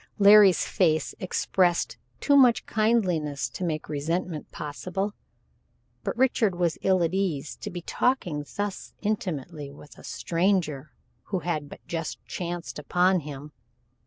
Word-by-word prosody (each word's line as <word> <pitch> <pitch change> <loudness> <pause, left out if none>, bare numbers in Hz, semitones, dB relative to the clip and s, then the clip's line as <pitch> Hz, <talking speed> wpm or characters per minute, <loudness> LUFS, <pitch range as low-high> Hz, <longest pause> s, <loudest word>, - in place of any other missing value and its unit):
Larry's 200 -2 +7
face 160 -5 +1
expressed 180 -1 +1 0.2
too 285 - +3
much 250 -4 +5
kindliness 185 -11 +1
to - - -6
make 155 -3 -2
resentment 155 +2 -3
possible, 185 +7 -4 0.9
but - - -3
Richard 240 -6 +2
was 175 -2 0
ill 185 -2 +3
at 165 +1 0
ease 170 -7 -1
to - - -6
be 175 -1 -6
talking 180 - 0
thus 205 -1 -4
intimately 165 -8 -3
with 145 +1 -14
a - - -14
stranger 165 -5 0 0.3
who 190 -3 -2
had 155 -5 -2
but - - -12
just 165 -2 -4
chanced 175 -3 -5
upon 180 +4 +2
him. 145 -1 -8
175 Hz, 130 wpm, -26 LUFS, 155-195 Hz, 0.9 s, Larry's